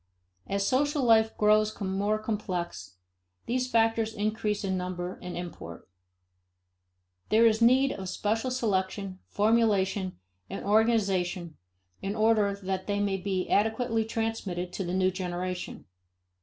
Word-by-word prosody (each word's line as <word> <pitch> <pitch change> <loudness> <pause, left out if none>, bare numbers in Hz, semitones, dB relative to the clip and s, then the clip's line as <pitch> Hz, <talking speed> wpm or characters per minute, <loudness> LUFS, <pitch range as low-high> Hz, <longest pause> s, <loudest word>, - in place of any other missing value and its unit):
As 200 0 0
social 290 +4 +1
life 220 -2 +4
grows 215 0 +3
more 200 +2 0
complex, 185 - -4 0.5
these 250 +1 -1
factors 225 -1 +2
increase 210 0 -1
in 190 -1 -1
number 180 0 -4
and 180 -1 -6
import. 160 - -8 1.4
There 225 +2 +5
is 220 0 +3
need 260 +4 +5
of 190 -2 -5
special 225 +7 -1
selection, 195 -5 -1
formulation, 205 -3 +1 0.3
and - - -6
organization 195 -6 +1 0.5
in 195 +2 -3
order 215 -2 +3
that 190 0 -3
they 205 0 0
may 200 -1 0
be 185 -1 -2
adequately 225 +2 +1
transmitted 215 -6 -3
to 195 - -3
the 175 0 -3
new 185 0 +2
generation. 180 -1 -4
205 Hz, 125 wpm, -28 LUFS, 185-225 Hz, 1.4 s, There